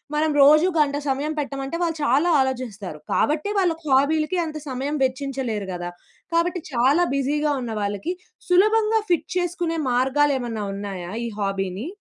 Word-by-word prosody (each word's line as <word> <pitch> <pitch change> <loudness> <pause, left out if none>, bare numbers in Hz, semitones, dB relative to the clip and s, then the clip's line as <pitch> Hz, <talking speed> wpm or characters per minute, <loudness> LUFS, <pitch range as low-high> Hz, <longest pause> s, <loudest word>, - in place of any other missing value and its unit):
మనం 310 +1 +2
రోజూ 305 +5 +6
గంట 285 -1 +2
సమయం 285 +4 -1
పెట్టమంటే, 275 +2 -4
వాళ్ళు 330 -2 -1
చాలా 290 +8 +3
ఆలోచిస్తారు. 220 - -4
కాబట్టే, 305 +7 +1
వాళ్ళకి 330 -4 0
హాబీ‌లకి 305 +6 +2
అంత 310 -1 -5
సమయం 275 +4 -2
వెచ్చించలేరు 260 -6 -3
గదా! 175 0 -4 0.5
కాబట్టి, 350 +1 +1
చాలా 270 +9 +3
బిజీ‌గా 295 +2 +1
ఉన్నవాళ్ళకి, 210 - -3 0.4
సులభంగా 430 +4 +4
ఫిట్ 345 - +1
చేసుకునే 350 -2 -1
మార్గాలేమన్నా 255 -3 +1
ఉన్నాయా 195 -3 -6
ఈ - - -2
హాబీ‌ని? 195 - -2
280 Hz, 130 wpm, -23 LUFS, 235-325 Hz, 0.5 s, రోజూ